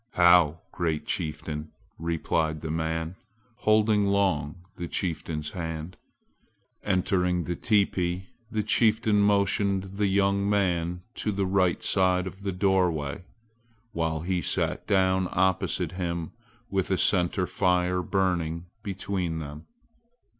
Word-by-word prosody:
"How, 85 -3 +5
great 80 -4 -2
chieftain!" 75 0 -3 0.3
replied 80 -1 -1
the 80 - -4
man, 80 +2 -2 0.4
holding 110 -2 +3
long 90 -4 0
the 85 - -5
chieftain's 80 -4 -3
hand. 80 -1 -5 0.9
Entering 90 -2 +1
the 85 +2 -3
teepee, 95 -4 0 0.2
the 110 -2 -1
chieftain 110 -1 +3
motioned 100 -1 +2
the 100 +1 -2
young 100 +1 +2
man 90 -3 0
to 105 - -1
the 100 -1 -1
right 95 -2 +1
side 90 -1 +3
of 95 +1 -8
the 100 -1 -2
doorway, 90 -5 0 0.7
while 80 -5 -1
he 90 +1 -1
sat - - 0
down 95 -2 +2
opposite 90 -2 +1
him 85 -3 -3 0.4
with 95 -1 0
a 95 - +2
center 90 0 +3
fire 90 -1 +1
burning 90 -3 -1 0.2
between 95 -4 -3
them. 75 -1 -8
90 Hz, 120 wpm, -27 LUFS, 85-100 Hz, 0.9 s, How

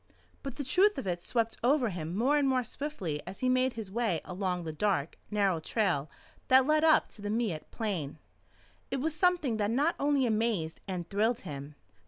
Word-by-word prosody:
But 275 -3 -6
the 285 - -4
truth 390 +10 +3
of - - -4
it 175 -2 -2
swept 230 +3 -1
over 255 -1 +3
him 170 -2 -4
more 265 +7 +3
and 285 -2 +3
more 255 -1 +2
swiftly 215 - -4
as 190 - -8
he 255 - +2
made 255 0 +2
his 220 -4 -7
way 220 -6 0
along 180 -1 -2
the 160 -1 -5
dark, 165 -3 -1
narrow 200 -5 +1
trail 160 -5 0 0.4
that 260 0 +6
led 305 +2 +3
up 315 -1 +5
to 210 - -9
the 205 - -4
Miette 215 -8 -2
Plain. 180 -11 -3 0.7
It 270 - -2
was 310 +4 -1
something 340 - +2
that 205 -1 0
not 285 +9 +2
only 285 -2 +2
amazed 215 -8 0
and 180 -3 -4
thrilled 220 +5 +1
him. 145 0 -7
220 Hz, 195 wpm, -30 LUFS, 180-265 Hz, 0.7 s, that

